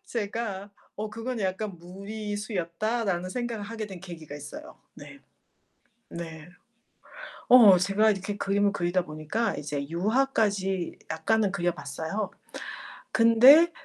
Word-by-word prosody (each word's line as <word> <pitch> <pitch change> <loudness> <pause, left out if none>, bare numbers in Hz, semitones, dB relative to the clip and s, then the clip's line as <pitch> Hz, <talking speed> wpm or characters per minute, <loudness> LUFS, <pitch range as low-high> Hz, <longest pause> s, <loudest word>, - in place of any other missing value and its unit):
제가 205 -3 -4 0.2
어 215 +1 -5
그건 230 +2 -4
'약간 195 0 -2
무리수였다.'라는 200 +1 -3
생각을 235 -2 -3
하게 220 0 -5
된 190 -2 -8
계기가 165 -5 -9
있어요. 145 0 -10 0.2
네. - - -12 0.9
네. 165 -2 -8 1.0
어, 225 -7 +9
제가 200 +4 +3
이렇게 200 0 -3
그림을 200 0 +1
그리다 175 -1 0
보니까 155 +9 -2
이제 145 -1 -4
유화까지 200 - 0
약간은 200 +5 +1
그려 175 -2 0
봤어요. 160 +7 -4 0.8
근데 255 +9 +7
200 Hz, 255 characters per minute, -27 LUFS, 175-220 Hz, 1.0 s, 어